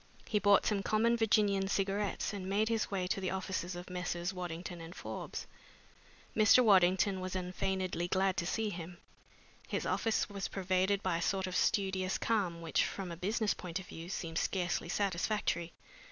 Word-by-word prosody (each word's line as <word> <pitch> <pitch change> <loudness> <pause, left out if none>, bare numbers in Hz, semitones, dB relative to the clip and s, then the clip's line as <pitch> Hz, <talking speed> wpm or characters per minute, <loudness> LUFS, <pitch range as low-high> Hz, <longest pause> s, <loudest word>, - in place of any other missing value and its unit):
He 210 - +2
bought 205 -1 +5
some 205 -2 +1
common 220 +4 +2
Virginian 205 -3 +3
cigarettes 200 +1 -1
and 190 -2 -5
made 210 +3 +2
his 225 -2 0
way 190 -2 -1
to 190 +2 -1
the 185 - -1
offices 185 -1 -3
of 175 +1 -7
Messrs. 180 0 -3
Waddington 175 -1 -5
and 165 +3 -9
Forbes. - - -6 0.9
Mr. 220 +3 +7
Waddington 190 -1 +4
was 185 0 -4
unfeignedly 185 -1 -1
glad 190 +1 +2
to 170 - -1
see 220 +1 -1
him. 175 -1 -7 0.7
His - - -2
office 225 -1 +1
was 200 -1 -4
pervaded 190 +1 +1
by 180 -3 +1
a - - -3
sort 190 +2 0
of 185 -1 -4
studious 190 -2 +1
calm 185 -7 0
which, 165 - +2
from 190 -3 -4
a - - -4
business 210 +5 0
point 175 -1 -5
of 190 - -9
view, 165 0 -9
seemed 165 -3 -2
scarcely 180 -3 -1
satisfactory. 185 -2 0
190 Hz, 170 wpm, -33 LUFS, 180-200 Hz, 0.9 s, Mr